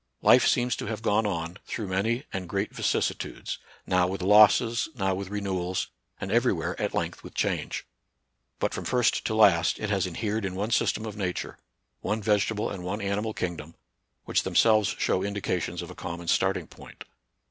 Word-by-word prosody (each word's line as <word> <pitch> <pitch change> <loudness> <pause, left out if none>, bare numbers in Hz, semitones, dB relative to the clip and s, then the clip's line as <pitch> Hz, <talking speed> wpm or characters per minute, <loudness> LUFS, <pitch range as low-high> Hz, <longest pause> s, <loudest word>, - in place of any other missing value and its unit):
Life - - +6
seems 125 -1 +2
to - - -5
have 110 0 -4
gone 105 0 +2
on, 85 -2 -3
through 110 - -3
many 105 +7 0
and 95 -2 -4
great 100 +1 -2
vicissitudes, - - -2 0.3
now 90 -1 +3
with 95 0 -4
losses, 110 - +5
now 95 -4 0
with 95 0 -4
renewals, 95 -3 -2 0.3
and 95 - -4
everywhere 115 -8 +1
at - - -1
length - - -2
with - - -11
change; - - -1 0.7
but - - -1
from - - -4
first 125 -2 +2
to 110 - 0
last 95 -5 +5
it 105 -1 -3
has 95 -2 +1
inhered 105 +4 -2
in 95 -1 -3
one 105 +4 -2
system 110 0 +1
of 105 -2 -6
nature, 90 -3 -3 0.4
one 105 +1 -1
vegetable 105 0 +1
and 95 -3 -6
one 95 +4 -3
animal 105 +2 -2
king 90 -2 -2
dom, 80 +2 -10 0.5
which - - +2
themselves 110 -3 +3
show 95 - +1
indications 90 -3 -2
of 85 - -8
a - - -11
common 85 -1 -6
starting - - +2
point. - - -13
100 Hz, 180 wpm, -27 LUFS, 90-110 Hz, 0.7 s, Life